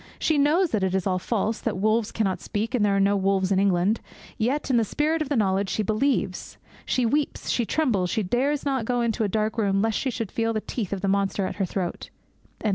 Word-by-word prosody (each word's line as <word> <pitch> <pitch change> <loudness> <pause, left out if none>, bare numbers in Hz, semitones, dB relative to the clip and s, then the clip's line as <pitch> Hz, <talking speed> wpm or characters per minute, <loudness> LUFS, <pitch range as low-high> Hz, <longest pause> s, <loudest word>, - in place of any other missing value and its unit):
She 315 -2 +1
knows 320 +5 +3
that 215 -4 0
it 190 0 0
is 190 - 0
all 185 -2 +1
false, 220 +2 -1
that - - -2
wolves 215 +2 +1
cannot 195 -4 -1
speak, 215 +3 -3
that 250 -4 0
there 205 -1 +3
are - - +2
no 200 +1 +3
wolves 195 -1 +1
in 190 - +3
England. 195 +2 +2 0.3
Yet, 265 +5 -1
in 235 -2 +4
spite 305 +8 0
of 300 - -2
the 290 - 0
knowledge, 195 -3 +1
she 215 - 0
believes; 225 +7 -1 0.3
she 250 - +1
weeps; 285 +5 -1
she 235 -3 0
trembles; 210 - +1
she 220 +2 0
dares 270 +9 0
not 265 -5 0
go 245 0 0
into 230 -1 0
a - - +2
dark 215 +3 -1
room 195 -2 +2
lest 225 -1 0
she 270 - -1
should 225 -5 -4
feel 230 0 0
the 215 - -1
teeth 215 -5 -4
of 200 -2 -3
the 200 - -1
monster 195 0 +1
at - - -5
her 195 - +1
throat.' 180 -1 -4
215 Hz, 235 wpm, -25 LUFS, 195-250 Hz, 0.3 s, in